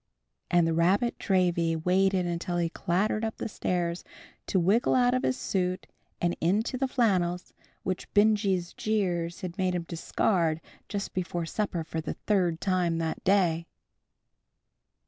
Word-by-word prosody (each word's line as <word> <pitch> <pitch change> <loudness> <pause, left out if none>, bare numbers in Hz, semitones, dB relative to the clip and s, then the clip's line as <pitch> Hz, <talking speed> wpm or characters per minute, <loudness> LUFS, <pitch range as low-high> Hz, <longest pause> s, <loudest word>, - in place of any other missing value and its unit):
And 175 -1 +4
the 165 - +1
"rabbit 190 +9 +2
dravy" 175 -4 +2
waited 185 +3 +2 0.2
while 175 -1 0
he 170 -1 +1
clattered 195 +6 0
up 220 0 -2
the - - -3
stairs 175 -4 -2 0.4
to - - +1
wriggle 195 +7 +3
out 245 -1 +4
of 255 - +1
his 260 - 0
suit 185 -4 -1 0.3
and 175 0 0
into 205 +9 +1
the 265 +1 0
flannels, 185 -9 0 0.3
which 185 -1 -3
Benjy's 205 -4 +3
jeers 175 -6 -1
had 185 +1 -6
made 185 -1 +1
him 175 - -2
discard 165 0 0 0.3
just 200 -1 -4
before 175 -2 -2
supper, 175 -1 -2
for 160 0 -4
the 160 - -4
third 180 -6 0
time 180 -3 +1
that 160 -1 -3
day. 175 -4 +2
180 Hz, 145 wpm, -28 LUFS, 170-205 Hz, 0.4 s, And